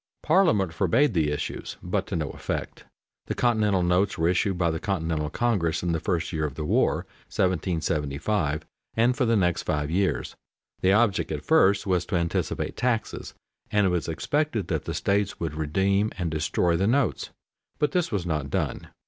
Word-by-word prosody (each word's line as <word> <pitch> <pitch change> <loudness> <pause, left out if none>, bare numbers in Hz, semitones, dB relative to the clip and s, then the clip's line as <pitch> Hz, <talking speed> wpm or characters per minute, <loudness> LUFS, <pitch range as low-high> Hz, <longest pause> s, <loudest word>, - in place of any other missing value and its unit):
Parliament 130 - +3
forbade 110 - +2
the 80 -4 +2
issues, 75 0 -4
but - - -1
to - - -3
no 80 -4 -2
effect. - - -5 0.4
The - - -2
continental 105 -6 +2
notes 90 +3 +2
were 80 +1 +2
issued 90 +1 +1
by 85 -2 +2
the 80 - -3
Continental 80 -6 -1
Congress 95 -6 0
in 90 - 0
the 80 - 0
first 85 -1 -2
year 80 -1 -1
of 75 -3 -2
the 75 - -4
war - - +1 0.2
(1775), 80 -2 -1 0.3
and 120 +3 +3
for 130 -2 +1
the 115 0 +3
next 90 -4 +2
five 75 0 -2
years. 95 +2 0 0.5
The 95 - +4
object 105 -1 +2
at - - -4
first 100 +1 +4
was 90 -3 0
to 95 - -2
anticipate 85 -1 -1
taxes, 120 -3 -2 0.3
and 105 -1 +2
it - - +3
was 90 -2 -1
expected 120 - -1
that - - -1
the - - -3
states 100 0 0
would 80 -2 -3
redeem 95 +7 +1
and 85 -3 -2
destroy 80 +2 +1
the 95 +4 +1
notes, 130 +1 +1 0.5
but 150 -2 +1
this 180 0 0
was 100 -5 -1
not 75 -5 -2
done. - - -2
90 Hz, 180 wpm, -26 LUFS, 80-105 Hz, 0.5 s, The